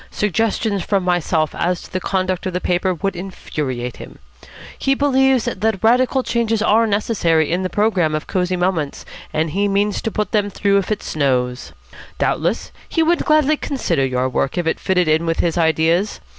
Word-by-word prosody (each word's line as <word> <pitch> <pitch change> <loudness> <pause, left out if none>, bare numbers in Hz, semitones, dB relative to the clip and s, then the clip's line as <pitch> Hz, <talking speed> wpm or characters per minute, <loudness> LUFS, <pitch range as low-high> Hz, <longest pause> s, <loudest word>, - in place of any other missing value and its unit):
Suggestions 210 0 0
from 195 0 0
myself 170 -3 0
as 180 0 -1
to - - -15
the 185 - 0
conduct 185 0 -1
of 185 - -4
the 180 - -1
paper 180 +1 0
would 185 +3 -2
infuriate 140 -9 -5
him. - - -11 0.6
He 270 - +1
believes 265 -3 +3
that 220 -3 -1
radical 255 +3 +3
changes 230 -2 0
are 225 +1 +3
necessary 180 -7 +1
in 175 +2 0
the 185 - -2
programme 190 -8 +1
of 155 - -3
Cosy 185 -1 -1
Moments, 175 -5 -1 0.3
and 155 0 -1
he 200 +5 +1
means 200 +1 0
to - - -2
put 210 -1 -2
them 205 -2 +1
through 200 0 +2
if 195 - -4
it 210 - -2
snows. 125 -4 -1 0.5
Doubtless - - -1 0.2
he 325 - +2
would 340 +1 +1
gladly 305 0 +3
consider 265 - -1
your 130 -1 0
work 130 +3 -1
if 175 - 0
it 160 - 0
fitted 180 -2 +1
in 160 +2 +2
with 165 - 0
his 170 - +1
ideas. 165 +4 +1
185 Hz, 185 wpm, -19 LUFS, 165-220 Hz, 0.6 s, believes